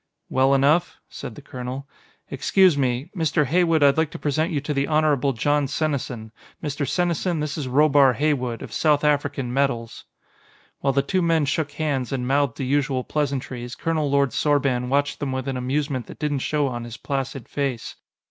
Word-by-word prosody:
"Well 135 +1 +3
enough," 150 +6 +2
said 110 - -8
the 145 - -12
colonel. 130 +1 -6 0.4
"Excuse 180 +5 +4
me 130 -1 -1
Mr. 160 -3 +1
Heywood, 165 +1 +3
I'd 140 +2 +5
like 160 -2 +1
to - - -8
present 155 +4 0
you 150 - 0
to 150 +1 -3
the 140 0 0
Honorable 150 -3 +2
Jon 145 +4 +1
Senesin; 135 -7 -3 0.3
Mr. 145 -2 -2
Senesin, 175 -1 0
this 150 -1 -2
is 145 -5 -4
Robar 140 -1 +4
Heywood, 130 -4 -1
of - - -9
South 150 -2 +2
African 145 -4 0
Metals." 130 -4 -1 0.7
While 135 -1 +1
the 140 +1 +2
two 185 +6 0
men 165 -3 +2
shook 145 +1 -1
hands 140 -6 -2
and 125 -2 -2
mouthed 140 -2 +1
the 135 - -3
usual 135 -1 0
pleasantries, 130 -4 -3
Colonel 155 0 -1
Lord 140 -2 +2
Sorban 135 -3 +1
watched 145 +1 0
them 140 -2 -2
with 130 0 -3
an 135 - -2
amusement 130 0 -2
that - - -10
didn't 150 -2 -1
show 150 +2 0
on 120 -3 -3
his 115 -1 -8
placid 135 0 -4
face. 135 -5 -3
140 Hz, 180 wpm, -23 LUFS, 130-150 Hz, 0.7 s, I'd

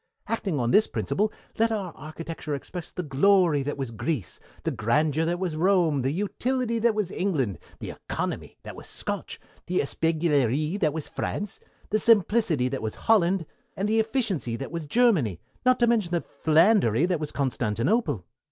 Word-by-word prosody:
Acting 195 -9 -1
on 120 -1 +1
this 215 - +5
principle 210 +2 -1 0.3
let 225 0 +4
our 195 -6 -3
architecture 155 0 -6
express 170 +4 -7
the 180 - -4
glory 160 +1 +3
that 145 +1 -3
was 135 -4 -4
Greece, 115 - -3 0.2
the - - 0
grandeur 150 +8 +1
that 175 +1 0
was 175 -3 -2
Rome, 170 -4 +3
the 130 - 0
utility 230 - -1
that 230 -1 +2
was 210 -4 -1
England, 135 - -1 0.2
the - - -6
economy - - -4
that - - -8
was - - -10
Scotch, - - -4 0.3
the 180 +1 -1
espièglerie 155 - +1
that 155 -5 +2
was 155 0 -5
France, 205 -1 -4 0.3
the 215 - +3
simplicity 210 - +3
that 135 +1 -3
was 110 -1 -3
Holland, 190 -5 +3 0.3
and 195 +3 0
the 220 +1 +2
efficiency 215 - -1
that 135 +4 -6
was 165 -3 -4
Germany, 155 - +3 0.3
not 255 - +5
to - - +7
mention 230 -6 +2
the 170 - +2
philandery 160 - +3
that 180 -3 0
was 150 -1 -4
Constantinople. 130 - 0
165 Hz, 170 wpm, -26 LUFS, 140-205 Hz, 0.3 s, to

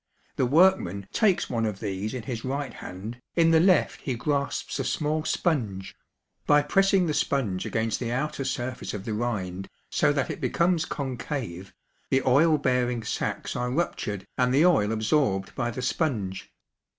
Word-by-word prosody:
The 130 - +1
workman 140 - +3
takes 210 -5 +2
one 115 -2 -1
of 100 -2 -4
these 105 +2 -3
in 125 - -5
his 115 -1 -5
right 135 -1 -3
hand, 110 +7 -8
in 165 -1 +4
the 160 - +6
left 180 -1 +3
he 130 - -2
grasps 140 +3 -2
a - - 0
small 155 0 -1
sponge; 110 - -1 0.5
by 145 0 +5
pressing 195 +4 +3
the 155 - 0
sponge 110 -12 0
against 110 -1 -1
the 120 -2 -3
outer 135 +2 -2
surface 125 -3 -3
of 100 -1 -6
the 110 - -2
rind 95 -5 -3 0.2
so - - +3
that - - -1
it - - -7
becomes 170 -1 +1
concave, 125 - -4 0.4
the 135 0 +2
oil 150 +5 +5
bearing 125 -4 0
sacs - - -3
are 125 0 -1
ruptured 115 - -2
and 125 0 +3
the 145 +6 +4
oil 110 -13 +4
absorbed 110 -3 +1
by 120 - -1
the 125 +2 -5
sponge. 110 - -2
125 Hz, 165 wpm, -26 LUFS, 110-150 Hz, 0.5 s, the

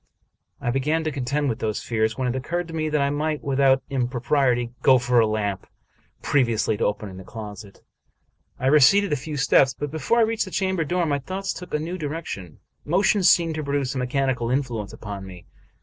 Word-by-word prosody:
I 120 - -1
began 150 +5 0
to 155 - -1
contend 140 +2 -1
with 115 -4 -2
those 110 -1 -2
fears, 110 -1 0
when 130 -1 -1
it 125 - -1
occurred 170 +7 -3
to - - -8
me 155 -1 -1
that 150 -1 +1
I 140 - +1
might, 150 +1 -2
without 135 -1 +3
impropriety, 125 -1 +1
go 130 -1 +6
for 120 0 +2
a 110 - +4
lamp 105 -3 -2 0.6
previously 115 -6 +1
to - - 0
opening 105 -2 -3
the 95 - -9
closet. 105 -1 -10 0.7
I 130 - -4
receded 150 +7 +5
a - - +3
few 145 +2 -5
steps; 135 -1 +4
but 145 +1 -4
before 160 +9 0
I - - +5
reached 225 -1 0
the - - -8
chamber 190 -2 0
door 175 +3 0
my 145 -2 0
thoughts 190 +6 -4
took 180 -2 -6
a - - +1
new 170 +4 -4
direction. 145 - -5 0.3
Motion 195 +5 +2
seemed 170 -2 +4
to 155 0 -4
produce 140 -2 -1
a 135 - -3
mechanical 125 -2 0
influence 120 -6 -2
upon 100 -2 -7
me. 90 -2 -11
135 Hz, 200 wpm, -24 LUFS, 120-155 Hz, 0.7 s, go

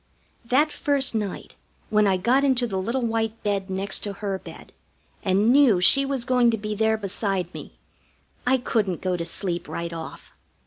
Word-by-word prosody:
That 275 +6 +2
first 280 -3 +1
night 210 -4 -4 0.4
when 210 -1 +4
I 190 -1 +2
got 245 +8 +2
into 260 -3 +2
the 195 -5 -3
little 235 +6 -2
white 225 -1 -2
bed 200 -2 -1
next 190 +1 -1
to 205 - -5
her 195 -1 -4
bed, - - -13 0.5
and 200 +4 +2
knew 265 -9 +5
she 275 +9 +6
was 270 -3 -2
going 250 -2 +3
to 225 - 0
be 210 0 -4
there 220 +1 +1
beside 195 -3 -2
me, - - -10 0.7
I 260 +1 +4
couldn't 210 -7 -1
go 185 -1 -1
to 170 -1 -4
sleep 175 0 -3
right 170 0 -5
off. 165 -1 -9
215 Hz, 180 wpm, -24 LUFS, 190-245 Hz, 0.7 s, she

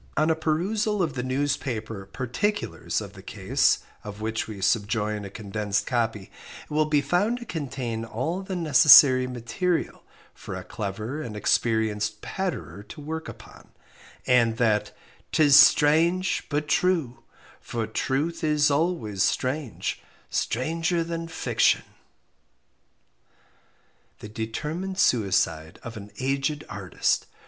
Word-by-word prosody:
On 155 +2 +3
a - - +2
perusal 195 +6 0
of 155 -5 -2
the 125 - -3
newspaper 130 -6 -2
"Particulars" 130 - -2
of - - -9
the - - -12
case, - - +1 0.2
of 105 0 -8
which 110 +1 -2
we 105 -3 -7
subjoin 105 0 0
a - - -7
condensed 105 0 -2
copy, 115 -5 -2 0.3
it - - -21
will 155 +1 +2
be 150 -1 +2
found 180 - +1
to 240 - -9
contain 130 - -4
all 130 - -3
the 190 -1 -5
necessary 145 -5 +7
material 125 +9 -2 0.3
for - - -8
a - - -6
clever 110 +6 -5
and 115 -7 -6
experienced 105 -1 0
"Patterer" 175 - -4
to 155 - -10
work 160 +2 -5
upon, - - -13 0.6
and 115 -3 +3
that 110 -3 +1 0.4
"'Tis 145 -3 +5
strange 170 +7 +5
but 150 0 -1
true; 165 -11 +1 0.4
for 115 -2 -4
truth 140 +10 -2
is 150 -1 +3
always 140 - 0
strange, 130 +1 -1 0.3
stranger 165 +7 0
than 165 0 -4
fiction!" 160 - +1 2.3
The 105 - -10
Determined 150 - -4
Suicide 90 - +1
of 115 - -7
an 105 -1 -9
Aged 135 +3 -1
Artist. 90 -4 -1
130 Hz, 125 wpm, -25 LUFS, 110-160 Hz, 2.3 s, necessary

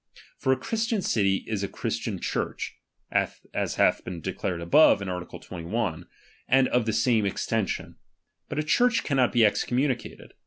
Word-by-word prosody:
For 130 - +1
a 130 - +3
Christian 225 - -1
city 100 -3 +1
is 110 -3 -2
a 100 - -1
Christian - - -3
Church, - - -3 0.4
(as - - -2
hath - - +3
been 90 -2 -6
declared 85 +2 -3
above, 95 - +5
in 100 - -5
art. 90 -1 -4
21), 90 -1 -4 0.4
and 130 0 +4
of 120 -2 +1
the - - +2
same 110 0 +3
extension; 105 +1 -2 0.5
but - - -4
a 155 - +1
Church 235 +9 +3
cannot 135 -4 +2
be 115 -2 +5
excommunicated. 125 +4 -1
115 Hz, 155 wpm, -26 LUFS, 95-135 Hz, 0.5 s, above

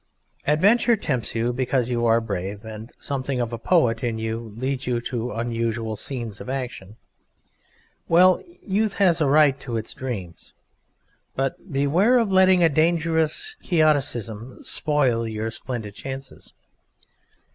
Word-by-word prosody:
Adventure 205 - +4
tempts 130 - -2
you 115 +2 0
because 125 -1 0
you 120 -1 +1
are 115 0 +4
brave, 100 -1 -5
and 110 +1 -8
something 135 -2 -3
of 120 -1 -2
a 115 - -4
poet 120 -6 +2
in 115 -2 -1
you 110 0 -4
leads 130 +2 -3
you 120 -1 +1
to 120 0 -3
unusual 115 -1 -2
scenes 115 -2 -5
of - - -8
action. 125 -7 -5 1.1
Well, 180 +2 +5 0.2
Youth 210 +1 0
has 180 -4 +3
a 150 - +3
right 145 -1 +4
to 120 -4 -4
its 110 - -5
dreams, 100 -11 -7 0.8
but 135 +7 -3
beware 165 - +3
of 225 -5 +1
letting 185 -1 +6
a - - +7
dangerous 160 - +1
Quixotism 130 - 0
spoil 130 -7 +1
your 110 0 -3
splendid 110 -3 -6
chances. 135 +4 -8
130 Hz, 135 wpm, -23 LUFS, 115-155 Hz, 1.1 s, a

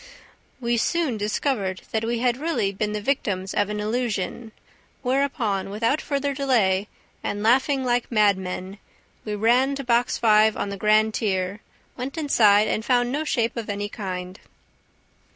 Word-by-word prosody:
We 235 -1 0
soon 305 -1 0
discovered 205 -2 -1
that 220 0 -1
we 235 +1 -1
had 245 0 +1
really 295 -9 -1
been 210 +2 -2
the 210 - -3
victims 195 -7 -1
of 205 0 +1
an 210 0 -3
illusion, 220 0 -2 0.5
whereupon, 250 -7 0
without 230 +9 0
further 280 -1 -1
delay 220 -8 +1 0.4
and 205 +1 -3
laughing 265 +4 +3
like 245 -1 0
madmen, 195 -2 0 0.5
we 210 -1 -3
ran 245 +6 +3
to 275 - -5
Box 240 -1 +1
Five 215 -1 +4
on 200 - -2
the 200 - -4
grand 215 +2 +3
tier, 190 -2 -1 0.4
went 260 +5 -5
inside 215 -9 +4
and 215 - -1
found 245 0 +2
no 295 +3 -1
shape 235 -6 0
of 230 -3 -5
any 205 0 -3
kind." 185 -2 -6
220 Hz, 150 wpm, -24 LUFS, 205-255 Hz, 0.5 s, Five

